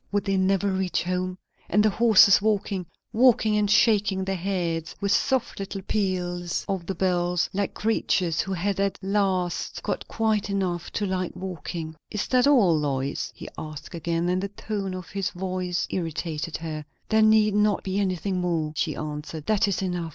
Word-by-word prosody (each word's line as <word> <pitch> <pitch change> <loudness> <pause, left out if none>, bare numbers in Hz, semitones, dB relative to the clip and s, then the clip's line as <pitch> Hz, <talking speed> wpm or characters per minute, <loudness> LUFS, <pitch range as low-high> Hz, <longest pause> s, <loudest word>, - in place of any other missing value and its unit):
Would 205 0 0
they 195 -1 +1
never 195 +1 +2
reach 190 -1 0
home? 180 +1 -2 0.3
And 210 +3 +4
the 215 - +4
horses 215 -3 +6
walking! 200 -4 0 0.3
Walking, 225 -2 +4
and 210 -1 +2
shaking 205 -3 +3
their 195 0 -1
heads, 170 -3 -2
with 200 -1 0
soft 260 0 +1
little 195 0 -5
peals 180 -4 -1
of 190 -4 -3
the 195 - -2
bells, 175 -1 +1
like 200 0 -1
creatures 185 -6 +1
who 195 - -5
had 195 +2 -1
at 200 0 0
last 190 -3 0
got - - -3
quiet 220 -2 0
enough 185 -4 -1
to 205 - -1
like 185 -2 -2
walking. 170 -3 -5
"Is 210 - -2
that 255 +1 +4
all, 220 - +5
Lois?" 140 -2 -1
he - - -9
asked 155 +2 -8
again; 170 0 -1
and 180 +1 +1
the 200 - -2
tone 200 -2 -4
of 180 -3 -8
his 195 -2 -1
voice 180 -1 -2
irritated 165 -2 -3
her. 155 -2 -5 0.3
"There 220 0 +4
need 215 -1 +5
not 210 -1 +2
be 190 +1 -1
anything 185 -1 -1
more," 165 -4 -1
she - - -1
answered. 150 0 -6
"That 210 -2 +2
is 195 -1 -1
enough. 175 -3 -2
190 Hz, 175 wpm, -25 LUFS, 175-205 Hz, 0.3 s, horses